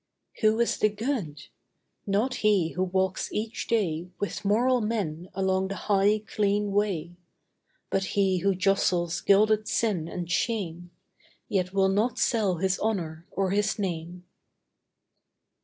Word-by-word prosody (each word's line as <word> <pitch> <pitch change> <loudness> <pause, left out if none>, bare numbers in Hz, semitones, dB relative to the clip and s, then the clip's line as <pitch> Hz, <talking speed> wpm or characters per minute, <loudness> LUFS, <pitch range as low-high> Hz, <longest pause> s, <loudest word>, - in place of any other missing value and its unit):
Who 220 0 +3
is 235 - +1
the 215 - +4
good? 210 - -3 0.6
Not 210 +6 +1
he 200 -6 +3
who 180 - -4
walks 190 0 -1
each 220 +2 -3
day 180 -7 0
With 205 - -4
moral 240 +5 +3
men 185 -6 -3
along 190 0 +1
the 195 - -4
high, 205 +2 +2
clean 205 -1 0
way; 180 -5 -1 0.7
But 195 - +1
he 190 -2 +3
who 195 +1 +1
jostles 180 -3 +1
gilded 215 +2 +3
sin 195 -9 0
and 175 0 -5
shame, 175 -2 -2 0.6
Yet 185 -2 0
will 195 0 +3
not 210 +6 +1
sell 210 -6 +1
his 190 +2 0
honour 170 -6 -2
or 195 -1 -1
his 205 +1 +1
name. 175 -2 -4
195 Hz, 135 wpm, -27 LUFS, 180-215 Hz, 0.7 s, the